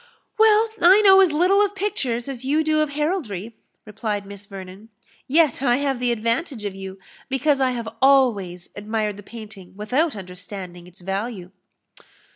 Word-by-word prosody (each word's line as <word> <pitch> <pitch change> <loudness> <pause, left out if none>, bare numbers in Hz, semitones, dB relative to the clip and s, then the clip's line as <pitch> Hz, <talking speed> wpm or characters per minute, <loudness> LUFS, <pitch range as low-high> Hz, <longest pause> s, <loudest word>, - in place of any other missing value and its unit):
"Well, 440 0 +5
I 380 +4 +7
know 385 -2 +7
as 370 -4 +4
little 365 +6 +3
of 405 -1 -2
pictures 280 - -2
as 265 -2 -6
you 295 +4 +1
do 310 0 +1
of 305 -1 +1
heraldry," 270 - -3 0.3
replied 210 -1 -4
Miss 200 0 -10
Vernon; 195 +2 -10 0.4
"yet 300 -2 +3
I 245 -3 +3
have 270 -1 -1
the 245 -1 +1
advantage 230 +2 -2
of 200 - -3
you, 190 0 -8 0.3
because 270 +1 +1
I 260 - +3
have 235 -3 -4
always 225 -10 +2
admired 210 0 -3
the - - -9
painting 205 -3 -12
without 260 +9 0
understanding 180 -2 -9
its 180 +1 -15
value." 195 0 -4
235 Hz, 160 wpm, -22 LUFS, 200-300 Hz, 0.4 s, I